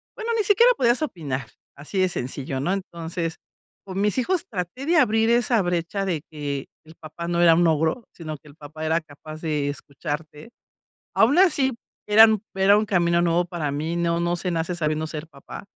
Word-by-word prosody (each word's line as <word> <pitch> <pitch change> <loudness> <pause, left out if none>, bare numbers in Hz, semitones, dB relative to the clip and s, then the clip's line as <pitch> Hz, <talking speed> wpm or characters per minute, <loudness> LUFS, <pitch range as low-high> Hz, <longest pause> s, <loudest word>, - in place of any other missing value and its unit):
bueno, 465 0 -3
ni 440 - +1
siquiera 460 +5 +5
podías 245 - +2
opinar 140 - -4 0.3
así 150 +7 -4
de 185 0 +3
sencillo, 130 -3 -3
¿no? 150 +8 0
Entonces, 170 -3 -4 0.5
con 195 0 -4
mis 210 +2 +1
hijos 345 +7 0
traté 190 - -5
de 340 +1 +3
abrir 225 -5 +3
esa 240 -1 +3
brecha 175 +2 -2
de 170 -6 -1
que 145 -3 -4 0.2
el 160 +1 -15
papá 160 +2 -8
no 170 0 0
era 170 -1 +7
un 175 +1 +3
ogro, 160 +8 0
sino 155 -3 -7
que - - -20
el 145 - -15
papá 155 0 -9
era 160 +1 +2
capaz 155 +1 -11
de 150 -3 -1
escucharte. 150 +4 -6 0.7
Aun 240 +8 +4
así 290 -8 +4 0.3
eran 215 0 +6
era 195 +1 +5
un 215 - +1
camino 170 -3 +2
nuevo 175 +1 +2
para 170 -4 -3
mí. 155 +4 -3
No, 170 0 0
no 170 0 0
se 180 +1 -2
nace 165 +1 -1
sabiendo 155 -1 -1
ser 155 +1 -6
papá. 140 +5 -11
170 Hz, 190 wpm, -24 LUFS, 155-210 Hz, 0.7 s, era